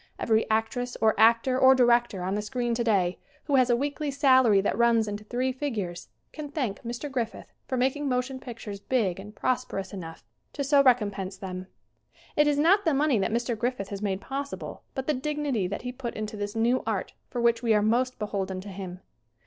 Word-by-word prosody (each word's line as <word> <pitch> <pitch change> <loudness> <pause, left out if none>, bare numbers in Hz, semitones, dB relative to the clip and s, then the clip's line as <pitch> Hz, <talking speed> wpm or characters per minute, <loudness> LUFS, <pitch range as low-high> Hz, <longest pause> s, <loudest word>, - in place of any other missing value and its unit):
Every 220 -1 +1
actress, 225 +3 -1
or 220 -1 +4
actor, 230 +3 +4
or 265 0 +7
director, 240 -6 +3
on 190 +1 -1
the 210 - -1
screen 240 +2 -2
today, 205 -7 +1 0.2
who 285 -2 +2
has 255 -1 +4
a 240 - +5
weekly 285 +3 -2
salary 260 -7 +5
that 195 - 0
runs 230 -1 +3
into 205 0 -5
three 250 +4 -1
figures, 225 -11 -4 0.3
can 305 -2 -6
thank 255 -9 -3
Mr. 240 +5 -5
Griffith 250 -5 -4
for 260 - -2
making 270 +3 0
motion 255 +1 -1
pictures 225 -5 -8
big 200 -5 0
and 210 +2 -10
prosperous 250 -7 -2
enough 165 -4 -8 0.3
to 285 - -2
so 280 0 +5
recompense 205 -7 +1
them. 185 -1 -6 0.7
It 295 0 +4
is 290 -1 +2
not 365 +7 +4
the 320 -6 +2
money 280 -5 +2
that 195 - 0
Mr. 235 +1 0
Griffith 235 -3 -2
has 200 -1 -5
made 195 -2 -1
possible, 280 +1 -5
but 265 - -3
the 305 - +1
dignity 280 -6 -1
that 200 +4 -5
he 250 - -3
put 245 -2 -6
into 215 0 -4
this 205 0 -4
new 235 +3 +2
art - - -2 0.2
for 245 - -4
which 235 -1 +3
we 230 -3 +3
are 210 - +3
most 250 +4 +1
beholden 195 -3 -3
to 200 - -9
him. 185 -1 -7
235 Hz, 200 wpm, -27 LUFS, 205-260 Hz, 0.7 s, or